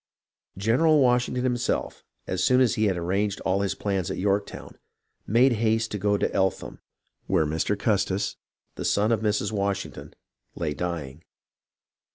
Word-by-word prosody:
General 130 +10 +3
Washington 125 -1 +2
himself, 125 -1 -1 0.2
as - - -2
soon 125 0 +4
as 125 -4 +3
he 110 - +1
had 95 -3 +1
arranged 95 +4 -1
all 95 +1 0
his 100 - -1
plans 95 -4 -2
at - - -4
Yorktown, 100 +1 -2 0.5
made 120 +5 +4
haste 110 0 0
to 105 - -3
go 100 +1 +2
to - - -1
Eltham, 95 0 -1 0.5
where 80 - +2
Mr. 80 +7 -1
Custis, 100 -1 0 0.4
the - - -6
son 105 +3 +2
of 110 -2 +1
Mrs. 105 -1 0
Washington, 100 -2 -3 0.4
lay 80 -3 -2
dying. 80 -3 -5
100 Hz, 150 wpm, -25 LUFS, 95-115 Hz, 0.5 s, soon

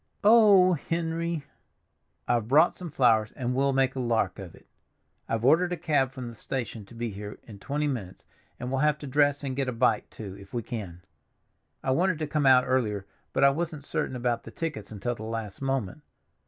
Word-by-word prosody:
"Oh, 205 -4 +7
Henry!" 165 0 -2 0.8
"I've 120 -3 +1
brought 155 +7 +5
some 180 -2 -7
flowers, 115 -6 +3
and 125 -2 -2
we'll 135 +2 +2
make 135 -1 +2
a - - -3
lark 110 -6 0
of 95 -4 -9
it. - - -20 0.6
I've 115 +1 -1
ordered 175 +6 +4
a 180 - -1
cab 145 -5 +1
from 130 -2 -7
the 120 - -7
station 115 -2 -5
to 105 - -15
be 115 -1 -3
here 105 +1 -7
in 105 -4 -12
twenty 145 +6 -2
minutes, 110 -10 -5 0.3
and 125 +1 -4
we'll 135 - 0
have 150 -1 +3
to 150 - -9
dress 145 +1 +2
and 135 -2 -3
get 135 -1 -1
a - - -1
bite, 115 -2 +1
too, 100 -4 -8
if 100 +3 -12
we 120 - -1
can. 90 -8 -7 0.8
I 130 - +1
wanted 180 +5 +2
to 155 - -2
come 150 -2 +1
out 130 -1 +7
earlier, 110 -7 0 0.3
but 135 - +1
I 140 - +7
wasn't 155 -1 -4
certain - - -2
about 120 -1 -1
the - - -11
tickets 150 -12 -5
until 110 +3 -3
the 115 - -11
last 110 -1 -5
moment. 135 -2 -2
130 Hz, 205 wpm, -27 LUFS, 115-150 Hz, 0.8 s, Oh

